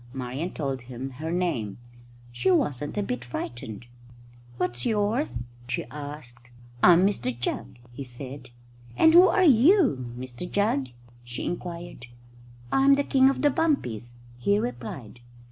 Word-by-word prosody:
Marian 130 +6 -3
told 135 -6 -3
him 125 +2 -7
her 160 - -3
name. 165 - -1 0.5
She 120 +7 0
wasn't 150 -3 +1
a 205 - +1
bit 125 -9 -3
frightened. 120 -2 -6 0.7
"What's 120 -8 -1
yours?" 210 - 0 0.3
she 130 - -2
asked. 145 -5 -8 0.3
"I'm 180 +1 +7
Mr 125 - -1
Jugg," 120 - -3 0.2
he 140 - -6
said. 130 +1 -8 0.5
"And 320 - +6
who 355 +2 +9
are 375 +1 +3
you, 265 - +4
Mr 130 +6 -7
Jugg?" 200 - +1 0.4
she 120 0 -6
inquired. 175 -7 -6 0.6
"I'm 275 +1 +5
the 285 - +1
King 265 -1 +4
of 275 - -2
the 290 - +5
Bumpies," 120 - -1 0.2
he 200 +12 +2
replied. 120 - -5
140 Hz, 135 wpm, -26 LUFS, 120-205 Hz, 0.7 s, who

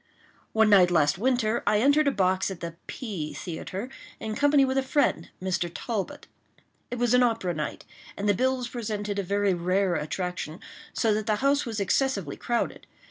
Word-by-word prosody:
One 220 -1 +4
night 185 -3 +7
last 155 -1 +2
winter 240 -1 +1
I 210 - +4
entered 285 +5 +4
a - - +4
box 190 -4 +1
at 190 -3 -6
the 170 -1 -6
P—— 195 - -5
Theatre, 185 +5 -5 0.3
in 220 -1 -4
company 285 +3 +4
with 265 0 +1
a - - +2
friend, 275 +2 +1
Mr. 180 -2 -1
Talbot. 210 +1 -4 0.6
It 245 - -4
was 245 0 +2
an 250 - +6
opera 225 -7 +1
night, 155 -1 -4 0.3
and 200 - -2
the 205 - +5
bills 255 +3 0
presented 210 -4 -3
a - - 0
very 200 +1 +1
rare 185 +2 +1
attraction, 170 +1 -3 0.3
so 225 -2 +1
that 215 0 -2
the 215 - +3
house 280 -1 +3
was 220 -2 -3
excessively 200 - 0
crowded. 240 -1 -2
210 Hz, 180 wpm, -27 LUFS, 185-245 Hz, 0.6 s, night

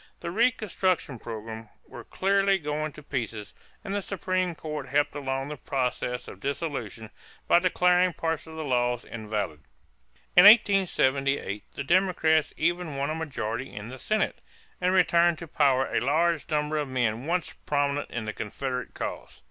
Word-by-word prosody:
The 170 - -4
reconstruction 195 - 0
program 110 -1 -7 0.2
was - - -11
clearly 195 0 +2
going 155 -2 -3
to 150 - -12
pieces, 115 -7 -4 0.3
and 195 - -4
the 205 - 0
Supreme 185 -2 -1
Court 150 -3 -5
helped 145 +2 +1
along 135 -1 -3
the 150 - -6
process 125 -2 -2
of - - -10
dissolution 135 - -4 0.4
by 170 - +6
declaring 180 0 +3
parts 160 -1 -2
of 160 - -10
the 160 - -4
laws 120 -3 0
invalid. 105 -8 -4 0.8
In 180 - +9
1878 140 - +4
the 140 - -3
Democrats 165 -2 +2
even 175 -2 0
won 140 +2 -1
a - - -1
majority 135 -6 -4
in 105 +2 -7
the 130 +1 -9
Senate 215 - -1 0.4
and 180 0 +2
returned 175 -2 +4
to 170 - -8
power 135 -3 +3
a - - +2
large 160 +4 +1
number 150 0 0
of 145 - -2
men 120 0 -1
once 175 0 -1
prominent 145 0 0
in 120 -2 -4
the 105 - -4
Confederate 125 +4 -4
cause. - - -6
150 Hz, 155 wpm, -27 LUFS, 125-175 Hz, 0.8 s, In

